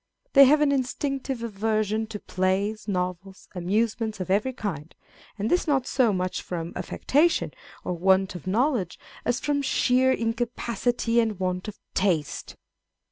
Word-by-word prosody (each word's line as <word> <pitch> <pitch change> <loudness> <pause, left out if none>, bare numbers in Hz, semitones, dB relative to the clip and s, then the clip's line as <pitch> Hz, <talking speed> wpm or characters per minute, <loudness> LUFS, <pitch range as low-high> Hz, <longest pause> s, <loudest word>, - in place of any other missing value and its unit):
They 275 -1 +9
have 295 +3 +5
an 295 -1 +4
instinctive 270 -1 -2
aversion 215 0 -1
to 215 -1 -6
plays, 195 +4 -1
novels, 185 0 -3
amusements 215 +4 -1
of 185 0 -3
every 210 +7 +2
kind; 175 - -5 0.4
and 205 +1 -1
this 355 +6 +1
not 270 -4 +2
so 255 -4 +2
much 185 -1 -2
from 170 -1 -5
affectation 320 +5 +1 0.3
or - - -2
want 190 +2 +2
of 180 0 -9
knowledge 220 - +1 0.3
as 245 - +1
from 290 -1 0
sheer 260 -1 +3
incapacity 235 0 0
and 220 -4 0
want 185 0 -2
of 210 - -7 0.2
taste. 175 -7 -1
215 Hz, 140 wpm, -26 LUFS, 185-250 Hz, 0.4 s, They